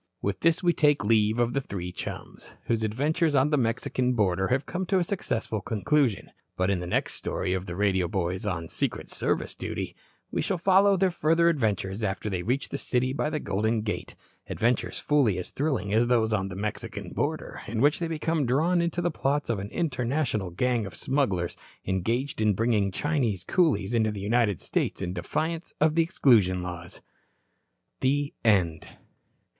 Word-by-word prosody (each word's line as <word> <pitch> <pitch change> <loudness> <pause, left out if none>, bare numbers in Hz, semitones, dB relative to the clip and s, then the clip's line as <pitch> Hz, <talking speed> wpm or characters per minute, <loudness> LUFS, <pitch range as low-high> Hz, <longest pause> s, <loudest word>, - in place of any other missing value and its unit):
With 100 0 -2
this 165 +2 +2
we 175 -1 +4
take 150 -9 +3
leave 110 0 +3
of 120 0 +1
the 140 - 0
three 90 -7 -5
chums, - - -8
whose 115 -1 0
adventures 145 +8 +1
on 135 +3 +3
the - - +4
Mexican 125 +1 0
border 95 -4 +1
have 130 +2 0
come 185 +1 -3
to 195 - +1
so 185 - +4
successful 120 - -2
a - - -12
conclusion. 125 +2 0 0.3
But 95 +1 +2
in 95 - 0
the 90 - -5
next - - 0
story 90 - -2
of 95 0 -3
"The 90 - -5
Radio 95 -2 +1
Boys 90 0 -2
on 85 -4 -2
Secret - - -3
Service - - -1
Duty" - - -5 0.4
we - - 0
shall 190 - -1
follow 195 +2 +4
their 185 0 +2
further 170 +1 +3
adventures 105 - -1
after 100 +1 -2
they 90 -2 -1
reach 125 +8 -1
the 140 - -4
city 130 +1 0
by 150 - -1
the 155 -1 -2
Golden 110 +2 0
Gate 105 0 -4 0.3
adventures 120 +1 0
fully 140 -10 +2
as 90 - -5
thrilling 135 -9 -1
as 115 +2 +3
those 115 -3 +2
on 95 -2 0
the 90 - -7
Mexican 105 +2 -5
border, - - -3
in 110 +1 -3
which 145 +4 +3
they 170 - -1
become 160 -3 -1
drawn 165 +8 +2
into 170 +1 -1
the 175 - +1
plots 145 -2 0
of 110 - -1
an 100 +1 -5
international 130 - -1
gang 115 +4 0
of 95 - -10
smugglers 100 -11 0 0.3
engaged 115 +8 -1
in 105 -2 +3
bringing 110 -2 +1
Chinese 120 - -1
coolies 120 - +1
into 110 -2 +2
the 105 -1 -4
United 105 -3 +1
States - - -1
in 90 -2 -3
defiance 160 - -3
of 155 0 +3
the 165 - +4
Exclusion 110 - +3
Laws. 85 -1 -7 1.0
THE 140 +2 +1
END. 90 -8 +2
115 Hz, 185 wpm, -27 LUFS, 100-150 Hz, 1.0 s, we